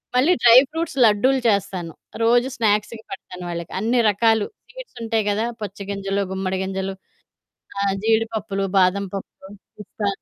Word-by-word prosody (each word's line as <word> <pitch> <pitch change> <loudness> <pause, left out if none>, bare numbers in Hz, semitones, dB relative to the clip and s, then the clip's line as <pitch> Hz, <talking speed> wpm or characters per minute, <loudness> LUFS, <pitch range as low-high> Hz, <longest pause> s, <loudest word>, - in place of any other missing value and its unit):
మళ్ళీ 290 +9 +4
dry 235 +1 +9
fruits 325 -2 -4
లడ్డూలు 255 +6 +3
చేస్తాను. 190 -4 -1 0.3
రోజూ 240 +2 +4
స్నాక్స్‌కి 220 0 0
పెడతాను 180 -1 -8
వాళ్ళకి. 170 -1 -5
అన్ని 235 +4 +1
రకాలు 220 +1 +2 0.2
స్వీట్సుంటయి 230 - -4
గదా! 215 +3 0 0.2
పుచ్చ 200 -1 -6
గింజలు, 200 0 -2
గుమ్మడి 190 0 -2
గింజలు, 190 0 -3 0.9
ఆహ్, 195 -1 +1
జీడిపప్పులు, 220 -3 0
బాదం 190 +2 +2
పప్పు, 190 0 -8 0.3
పిస్తా, 210 0 -5
210 Hz, 130 wpm, -22 LUFS, 195-230 Hz, 0.9 s, dry